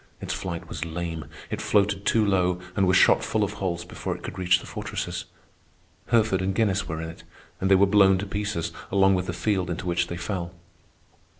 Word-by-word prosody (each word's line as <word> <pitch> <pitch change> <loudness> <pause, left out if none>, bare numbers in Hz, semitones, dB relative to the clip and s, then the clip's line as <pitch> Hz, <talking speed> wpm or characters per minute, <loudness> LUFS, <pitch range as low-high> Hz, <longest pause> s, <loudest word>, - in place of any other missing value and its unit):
Its - - -4
flight 85 -3 -5
was - - -4
lame. 85 -1 -4 0.3
It - - -3
floated 100 -1 +1
too 110 -2 +3
low 90 -2 +2 0.2
and 95 -1 +3
was 90 0 +5
shot - - +5
full 110 -1 0
of 105 - -2
holes 85 -2 -2
before - - -4
it - - -16
could 95 - -6
reach 90 -1 +4
the - - -11
fortresses. - - -4 0.8
Herford 110 -5 +3
and 95 +1 -1
Guinness 100 -3 +1
were 80 0 -4
in 80 - -5
it, - - -15 0.4
and 95 - 0
they 95 - +7
were 95 +1 +6
blown 95 -1 +5
to 95 - -3
pieces 100 -4 -2 0.2
along 95 0 +5
with 90 -1 0
the - - -1
field 90 +1 -1
into 85 +2 -4
which 85 0 0
they 85 - -5
fell. 90 -1 -4
95 Hz, 210 wpm, -25 LUFS, 85-100 Hz, 0.8 s, they